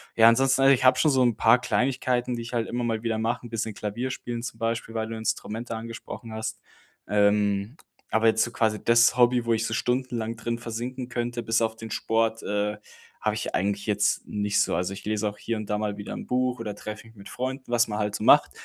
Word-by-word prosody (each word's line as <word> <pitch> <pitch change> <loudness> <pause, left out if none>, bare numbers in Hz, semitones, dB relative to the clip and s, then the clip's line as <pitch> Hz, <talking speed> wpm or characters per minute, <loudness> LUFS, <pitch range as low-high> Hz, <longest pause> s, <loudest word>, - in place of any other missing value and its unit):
Ja, 115 0 +7
ansonsten, 135 +3 +4
also 135 0 +7
ich 130 - +1
habe 130 0 +6
schon 150 +4 +4
so 130 -1 +3
'n 120 -3 +3
paar 115 +3 +5
Kleinigkeiten, 125 -1 0
die 120 - -4
ich 115 +1 -8
halt 115 -2 0
immer 120 +1 -2
mal 115 -1 -1
wieder 115 -1 -1
mache. 115 +2 -1
'n - - -8
bisschen 110 -2 -3
Klavierspielen 120 +3 -4
zum 115 -2 -6
Beispiel, 115 0 -2
weil 110 0 -1
du 115 - -5
Instrumente 110 +1 -3
angesprochen 115 0 -8
hast. 110 0 -4 0.5
Ähm, 100 +3 +2 0.3
aber 110 +1 +2
jetzt 110 0 +4
so 120 - -3
quasi 110 -3 0
das 115 0 +5
Hobby, 120 -1 +4
wo 115 - +2
ich 115 0 0
so - - -2
stundenlang 125 -3 -1
drin 115 +1 -3
versinken 120 +2 -5
könnte, 120 -1 -3
bis 115 0 +1
auf 110 0 0
den 115 0 -8
Sport, 115 0 0
äh, 105 +1 -1 0.4
habe - - 0
ich - - -4
eigentlich 100 +1 -1
jetzt 105 -1 +1
nicht 105 0 +1
so. - - +1
Also, 90 +2 -1
ich 95 - -9
lese 105 0 0
auch 105 - -11
hier 115 - -3
und 110 -1 -6
da 105 - +1
mal 105 -1 -2
wieder 100 - -7
'n - - -6
Buch 125 0 0
oder 105 -3 -4
treffe 110 +2 -8
mich 115 - -18
mit 100 -1 -12
Freunden, 130 0 -5
was 120 0 +3
man 105 -1 -3
halt 105 -1 -1
so - - -4
macht. - - +6
115 Hz, 235 wpm, -26 LUFS, 110-120 Hz, 0.5 s, Ja